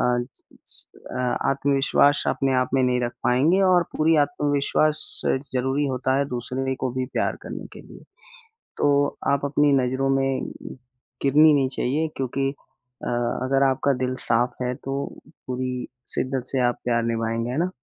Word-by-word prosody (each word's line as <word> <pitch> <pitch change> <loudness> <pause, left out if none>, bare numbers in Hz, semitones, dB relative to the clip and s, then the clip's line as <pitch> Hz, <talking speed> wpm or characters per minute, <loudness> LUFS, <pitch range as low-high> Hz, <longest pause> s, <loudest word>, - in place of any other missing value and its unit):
अ, 125 0 -3
आत्मविश्वास 140 +1 +3
अपने 135 -1 +1
आप 125 - 0
में 130 - +3
नहीं 125 0 +2
रख 120 0 -1
पाएँगे 150 +10 +3
और 185 -2 +5
पूरी 160 +1 +3
आत्मविश्वास 145 - 0 0.3
ज़रूरी 135 +3 0
होता 130 0 0
है 140 - +2
दूसरे 130 +2 -3
को 130 - -1
भी 130 0 -2
प्यार - - 0
करने - - -7
के - - -10
लिए। - - -14 0.8
तो 145 0 +2
आप 140 0 +1
अपनी 145 0 +3
नज़रों 130 +2 0
में 135 -1 -1 0.7
गिरनी 150 +3 +6
नहीं 135 -2 +3
चाहिए 150 +6 0
क्योंकि 135 +1 -1 0.6
अ, - - -3 0.4
अगर 135 +1 +2
आपका 135 +1 +1
दिल 130 0 -2
साफ 120 +1 +2
है 125 0 -1
तो 135 +2 -5 0.5
पूरी 125 0 -3 0.3
शिद्दत 130 -1 -1
से 135 - -1
आप 120 - -5
प्यार 120 -1 +1
निभाएँगे, 115 +1 -1
है 130 - -3
ना? 175 +2 +1
135 Hz, 150 wpm, -24 LUFS, 125-140 Hz, 0.8 s, गिरनी